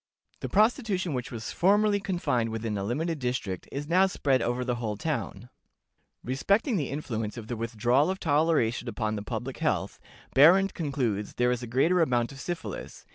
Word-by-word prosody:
The - - -5
prostitution 210 - +2
which 125 -2 -4
was 115 -2 -5
formerly 205 +2 +3
confined 175 - -1
within 110 -1 -3
a 100 - -2
limited 155 - -2
district 125 -8 -3
is 145 +1 -4
now 185 +4 +4
spread 135 -8 +1
over 120 +2 -1
the 125 -1 -1
whole 105 -3 -2
town." 125 -6 -3 0.8
Respecting 200 - +1
the 150 -8 -1
influence 115 -7 -4
of 115 - -6
the 120 - -4
withdrawal 120 - +1
of 190 0 -2
toleration 145 -6 +1
upon 110 -1 -2
the 105 - -4
public 105 - -5
health, - - -1 0.4
Behrend 180 +8 +6
concludes 125 - -2
there 125 0 +2
is 125 -1 -1
a 120 - -6
greater 160 +10 +3
amount 120 -6 +1
of 135 - -11
syphilis. 175 +5 -6
130 Hz, 175 wpm, -28 LUFS, 115-170 Hz, 0.8 s, Behrend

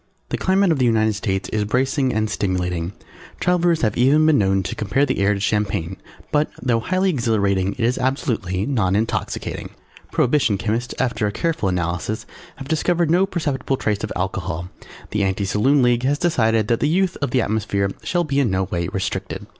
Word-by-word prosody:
The - - -1
climate 190 -1 +3
of 155 - +1
the 130 - +3
United 110 -2 +3
States 100 -2 -2
is 105 -1 0
bracing 130 +4 +1
and 110 -1 0
stimulating; 90 -4 -2 0.5
travellers 175 -3 +2
have 110 -3 +1
even 140 +5 +4
been 155 -5 +4
known 95 -1 +2
to - - -4
compare 125 +7 +1
the 130 -5 -1
air 100 +1 +3
to - - -4
champagne 100 -4 -1 0.4
but, 150 0 +2
though 120 -3 +1
highly 185 +9 +1
exhilarating 100 - +1
it 130 - -7
is 125 +3 +1
absolutely 115 -8 -1
non 105 -9 +1
intoxicating. 110 +2 -2 0.4
Prohibition 125 -6 +2
Chemists 115 +4 -2
after 120 -4 0
a - - -1
careful 155 - -1
analysis 90 +4 -2 0.3
having 135 0 -9
discovered 165 +2 +1
no 185 +3 +4
perceptible 140 -7 -2
trace 105 -4 -1
of 110 - -3
Alcohol, 90 -2 -3 0.4
The 105 - 0
Anti 95 +1 0
Saloon 125 +8 +3
League 120 -1 +3
has 140 +3 +1
decided 115 - +2
that 115 0 +1
the 150 - +1
use 185 +2 +1
of 140 - -2
the 125 0 +2
atmosphere 100 -2 -1
shall 175 -1 0
be 140 -3 0
in 135 -5 +2
no 95 0 +1
way 85 -2 -2
restricted. 95 0 -4
115 Hz, 185 wpm, -21 LUFS, 100-140 Hz, 0.5 s, even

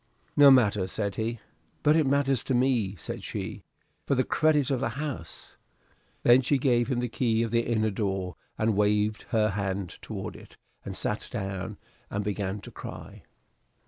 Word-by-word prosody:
"No 145 -1 +9
matter," 105 -8 +4
said 100 +1 -2
he. 115 +2 -2 0.4
"But 150 +1 +5
it 155 -3 +3
matters 135 -2 +2
to 130 - +1
me," 120 -6 +2
said 85 - -7
she, - - -5 0.5
"for 140 - +2
the 130 - +3
credit 150 -2 +2
of 130 - +1
the 135 - 0
house." 145 - -6 0.7
Then 120 +2 +7
she 140 +2 +2
gave 120 -3 +2
him 125 -3 0
the 125 - -1
key 115 -1 +1
of 115 - -3
the 115 0 +3
inner 110 -1 +2
door, 95 -4 -2 0.2
and 110 -1 +1
waved 105 +1 +1
her 110 -1 +2
hand 95 -2 -3
toward - - -6
it, - - -14 0.3
and 95 - -6
sat 105 - -2
down 95 -5 -4 0.3
and 105 +1 -2
began 100 -1 -2
to - - -10
cry. - - -9
110 Hz, 175 wpm, -28 LUFS, 100-130 Hz, 0.7 s, No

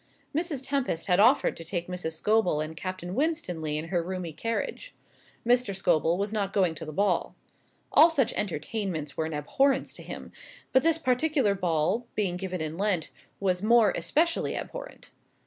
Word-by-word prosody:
Mrs 305 -5 -2
Tempest 270 - -1
had 180 0 +3
offered 245 +7 +5
to 165 - -8
take 175 +1 -3
Mrs. 180 -3 -3
Scobel 210 -1 +2
and 155 +1 -4
Captain 185 0 -5
Winstanley 185 - -1
in 160 +2 -5
her 175 -2 +1
roomy 180 -1 -5
carriage. 230 - -4 0.5
Mr. 240 -4 +2
Scobel 170 -2 +2
was 200 +2 -2
not 200 -3 -1
going 185 -5 +2
to 160 - -8
the 155 - -6
ball. 200 +6 0 0.6
All 320 - +8
such 280 -8 +1
entertainments 175 -4 -3
were 160 - -1
an 160 - -4
abhorrence 270 - +1
to - - -10
him; - - -8 0.4
but 260 - +6
this 325 +1 +3
particular 265 -4 +2
ball, 180 +5 0
being 195 -4 +1
given 185 -1 -4
in 160 +2 -4
Lent, 195 -6 0 0.3
was 185 -2 0
more 225 0 +5
especially 315 - +1
abhorrent. - - -7
195 Hz, 165 wpm, -28 LUFS, 165-250 Hz, 0.6 s, All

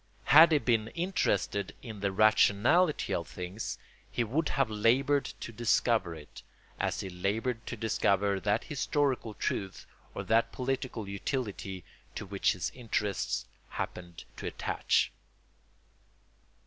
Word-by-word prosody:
Had 160 +3 +8
he 155 - +5
been 115 -6 +1
interested 105 - 0
in 110 -5 -7
the 100 0 0
rationality 110 - +4
of 85 -3 -2
things 90 +6 -5 0.3
he 120 - 0
would 145 +8 0
have 135 -3 +1
laboured 125 +7 +2 0.2
to - - -5
discover 115 -5 +1
it, 75 -2 -12 0.4
as - - -1
he 95 - -5
laboured 110 +6 -2
to 120 - -4
discover 100 -2 +1
that 105 +3 0
historical 140 -6 -1
truth 95 -1 -3 0.3
or - - -3
that 115 +1 +2
political 125 -4 -3
utility 100 - -4 0.3
to - - -5
which 100 0 +1
his 90 -3 -3
interests 105 -5 -2 0.2
happened 85 -2 -6
to - - -5
attach. - - 0
110 Hz, 125 wpm, -30 LUFS, 100-130 Hz, 0.4 s, Had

